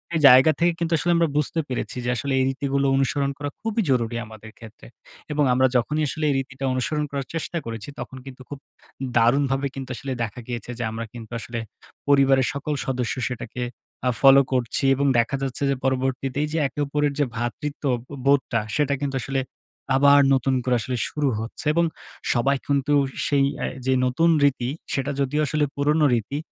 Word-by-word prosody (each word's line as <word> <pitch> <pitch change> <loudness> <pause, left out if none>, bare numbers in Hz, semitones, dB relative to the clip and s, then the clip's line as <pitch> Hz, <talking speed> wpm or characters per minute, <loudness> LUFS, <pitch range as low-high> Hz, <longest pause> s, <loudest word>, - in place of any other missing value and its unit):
এই - - +2
জায়গা 130 +4 +8
থেকে 170 +1 +4
কিন্তু 170 0 -1
আসলে 175 +3 0
আমরা 170 -1 +3
বুঝতে 150 +2 0
পেরেছি 125 0 -4
যে, - - 0
আসলে 135 +3 -2
এই - - +3
রীতিগুলো 140 +1 -1
অনুসরণ 140 +1 +1
করা 145 -1 -4
খুবই 225 0 -1
জরুরি 120 -2 +1
আমাদের 110 0 -12
ক্ষেত্রে। 110 -1 -13 0.4
এবং 150 0 +2
আমরা 130 +1 +4
যখনই 150 +6 +1
আসলে 155 +3 -4
এই 140 - +2
রীতিটা 135 0 -5
অনুসরণ 150 +4 -1
করার 140 -1 -3
চেষ্টা 165 +1 -3
করেছি 115 +2 -6
তখন 130 - -7
কিন্তু 130 -1 -10
খুব 145 -1 -7 0.6
দারুণভাবে 135 +3 +2
কিন্তু 135 -1 -6
আসলে 135 +2 -5
দেখা 115 +2 -5
গিয়েছে। 120 -1 -5
যে 120 - -1
আমরা 115 +1 -4
কিন্তু 115 -1 -10
আসলে 115 +2 -5 0.5
পরিবারের 135 -2 +4
সকল 140 +2 -3
সদস্য 125 -4 -1
সেটাকে 125 0 -6 0.5
আ - - +4
ফলো 135 0 +8
করছি। 125 0 0
এবং 140 +1 0
দেখা 120 +4 +1
যাচ্ছে 135 0 -3
যে 140 - +2
পরবর্তীতে 130 +1 -1
এইযে 150 +2 -2
একে 130 - -9
ওপরের 145 0 0
যে 145 - +3
ভ্রাতৃত্ব 120 +6 -4 0.2
বো 145 - -8
বোধটা 135 -4 +3 0.2
সেটা 145 -2 +1
কিন্তু 140 -2 -1
আসলে 135 +1 -1 0.5
আবার 140 +1 +6
নতুন 135 0 +1
করে 125 0 +2
আসলে 125 +3 -3
শুরু 145 -2 0
হচ্ছে 115 +6 -6
এবং 170 +1 +3 0.5
সবাই 135 +3 +2
কিন্তু 140 +1 +1 0.3
সেই 140 -1 +2 0.2
এ - - -1 0.2
যে 130 - +3
নতুন 165 +7 +2
রীতি। 130 -3 +2 0.2
সেটা 140 +1 -1
যদিও 140 +2 0
আসলে 150 +2 +1
পুরোনো 150 +2 +2
রীতি 120 +5 -1
135 Hz, 185 wpm, -23 LUFS, 125-145 Hz, 0.6 s, জায়গা